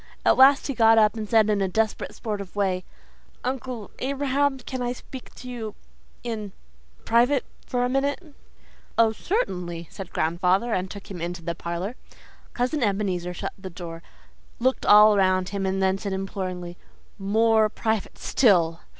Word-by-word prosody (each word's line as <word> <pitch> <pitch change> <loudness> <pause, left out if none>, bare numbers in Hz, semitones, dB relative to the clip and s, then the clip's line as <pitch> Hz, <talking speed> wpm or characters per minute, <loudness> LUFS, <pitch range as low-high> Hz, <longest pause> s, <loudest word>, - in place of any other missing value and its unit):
At - - +5
last 270 +2 +6
he 275 - -2
got 225 -2 +5
up 215 -1 +4
and 215 -2 -5
said 220 -2 +5
in 210 -2 +1
a 195 - +2
desperate 220 +3 -1
sort 210 -3 -4
of 195 -1 -10
way, 190 -3 0 0.6
'Uncle 250 -4 -4
Abraham, 275 +1 0
can 260 0 -6
I 245 0 -1
speak 255 +1 -10
with - - -13
you 235 -4 -6 0.5
in 215 -4 -4 0.5
private 245 +4 +3 0.2
for 245 -1 0
a - - +1
minute?' 285 +5 -1 0.6
'Oh, 225 -1 +5
certainly,' 180 - -2
said 190 -2 -8
grandfather, 180 +8 +1
and 185 +1 -1
took 200 0 -10
him 175 -3 -6
into 170 0 -4
the 170 0 -2
parlour. 170 +7 -4 0.6
Cousin 255 +4 0
Ebenezer 190 -5 -1
shut - - -4
the 190 -1 -7
door, 165 -1 -8 0.6
looked 260 +2 0
all 210 0 +8
around 185 -1 +2
him 195 -1 -2
and 190 0 0
then 190 0 +2
said 200 -1 -3
imploringly, 185 -2 -5 0.4
'MORE 220 +2 +3
PRIVATE 220 -1 -2
STILL. 170 -9 +3
210 Hz, 160 wpm, -25 LUFS, 185-245 Hz, 0.6 s, all